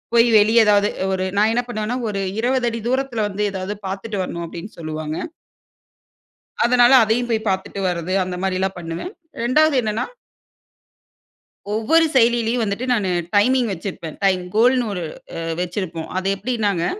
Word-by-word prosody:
போய் 230 Hz, +1 st, +6 dB
வெளியே 220 Hz, +3 st, +5 dB
ஏதாவது 205 Hz, 0 st, +4 dB, 0.3 s
ஒரு 185 Hz, 0 st, -1 dB
நான் 215 Hz, +2 st, +4 dB
என்ன 245 Hz, -, +2 dB
பண்ணுவேன்னா, 215 Hz, +1 st, -3 dB
ஒரு 200 Hz, -1 st, -3 dB, 0.2 s
20 250 Hz, 0 st, +1 dB
அடி 230 Hz, -, -4 dB
தூரத்தில 260 Hz, -4 st, 0 dB
வந்து 200 Hz, +1 st, -4 dB
ஏதாவது 190 Hz, +1 st, -4 dB
பார்த்துட்டு 200 Hz, +2 st, -4 dB
வரணும் 170 Hz, -1 st, -5 dB
அப்படின்னு 175 Hz, +6 st, -8 dB
சொல்லுவாங்க. 155 Hz, -1 st, -4 dB, 1.5 s
அதனால 245 Hz, +1 st, +5 dB
அதையும் 240 Hz, +3 st, 0 dB
போய் 220 Hz, -1 st, -1 dB
பார்த்துட்டு 190 Hz, +1 st, -2 dB
வர்றது 175 Hz, +1 st, -3 dB
அந்த 180 Hz, 0 st, -4 dB
மாரிலாம் 190 Hz, 0 st, -1 dB
பண்ணுவேன். 165 Hz, -, -6 dB, 0.3 s
2வது 295 Hz, +6 st, +3 dB
என்னன்னா 220 Hz, +1 st, -1 dB, 1.7 s
ஒவ்வொரு 325 Hz, +10 st, +3 dB
செயல்லீலயும் 235 Hz, -1 st, +3 dB
வந்துட்டு 210 Hz, +4 st, -2 dB
நான் 210 Hz, -5 st, 0 dB, 0.3 s
டைமிங் 245 Hz, +2 st, +3 dB
வச்சிருப்பேன். 170 Hz, -3 st, -6 dB
டைம் 185 Hz, -2 st, +3 dB
கோல்ன்னு 245 Hz, +1 st, +3 dB
ஒரு 180 Hz, -, -4 dB, 0.4 s
அ -, -, -4 dB, 0.2 s
வச்சிருப்போம். 175 Hz, -2 st, -4 dB
அது 190 Hz, -, -3 dB
எப்டின்னாங்க, 205 Hz, -5 st, -1 dB
210 Hz, 140 wpm, -21 LUFS, 185-240 Hz, 1.7 s, போய்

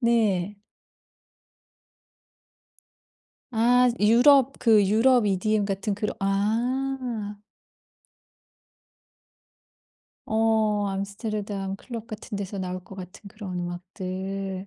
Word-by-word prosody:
네. 210 Hz, -5 st, +1 dB, 2.9 s
아 245 Hz, +2 st, +4 dB
유럽 255 Hz, +5 st, +5 dB
그 215 Hz, -4 st, +4 dB
유럽 225 Hz, +3 st, +4 dB
EDM 205 Hz, +2 st, +1 dB
같은 200 Hz, +1 st, -2 dB
그런 205 Hz, +1 st, -3 dB
아. 230 Hz, +2 st, -1 dB, 2.9 s
어 220 Hz, -2 st, +1 dB
암스테르담 200 Hz, 0 st, -4 dB
클럽 230 Hz, 0 st, -8 dB
같은 215 Hz, -2 st, -7 dB
데서 200 Hz, 0 st, -5 dB
나올 185 Hz, -1 st, -4 dB
것 195 Hz, -, -12 dB
같은 185 Hz, +2 st, -10 dB
그런 195 Hz, -3 st, -7 dB
음악들. 190 Hz, +2 st, -5 dB
210 Hz, 150 characters per minute, -25 LUFS, 195-230 Hz, 2.9 s, 유럽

